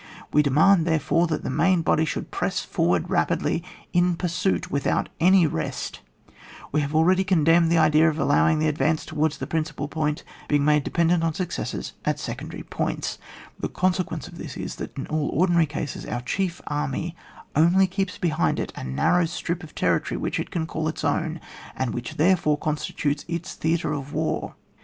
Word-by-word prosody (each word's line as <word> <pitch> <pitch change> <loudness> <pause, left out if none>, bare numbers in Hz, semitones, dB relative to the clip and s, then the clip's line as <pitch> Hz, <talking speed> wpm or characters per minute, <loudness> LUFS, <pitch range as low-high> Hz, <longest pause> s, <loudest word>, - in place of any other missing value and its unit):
We 150 - +6
demand, 160 +5 +4
there 160 -1 +3
fore, 165 +4 +2
that 155 - -2
the - - -2
main 175 +4 +3
body 160 0 +3
should - - -4
press - - -1
forward 85 -1 0
rapidly 165 - +1 0.3
in 175 0 +3
pursuit 180 +1 -1
without 140 - 0
any 185 0 +6
rest; 80 - -3 0.7
we 150 - +2
have 145 +1 -3
already 185 +4 +4
condemned 170 -2 +4
the 170 - +4
idea 155 0 +5
of 155 - -3
allowing 155 +2 +3
the 155 +1 +1
advance 155 +1 +1
towards 155 0 0
the - - -4
principal 155 -2 -2
point 150 0 -2 0.2
being 145 -1 +2
made 150 -1 +4
dependent 170 +1 +2
on 165 -2 0
success 180 -1 -4
at - - 0
secondary - - -6
points; - - -3 0.4
the - - -2
con 185 0 +1
sequence 165 -6 -4
of 170 -1 -12
this 140 -6 -7
is, - - -5
that - - -7
in 135 - -3
all 155 -2 -1
ordinary 170 -1 +3
cases, 145 -1 -5
our 120 - -3
chief 180 +7 -2
army 150 +3 -2 0.4
only 170 +5 +5
keeps 190 0 -2
behind 165 -2 +1
it - - -4
a - - -6
narrow 70 - +2
strip 170 +1 -3
of 160 -4 -12
territory 85 -2 0
which - - -2
it - - -3
can 165 -2 -2
call 160 -1 -3
its 155 - -4
own, 160 +2 0 0.4
and 130 -2 -2
which 120 - -5
therefore 155 -2 +3
consti 150 0 -3
tutes 145 0 0
its 170 +1 -4
theatre 160 -1 0
of 140 -1 -5
war. - - -2
160 Hz, 185 wpm, -24 LUFS, 150-175 Hz, 0.7 s, We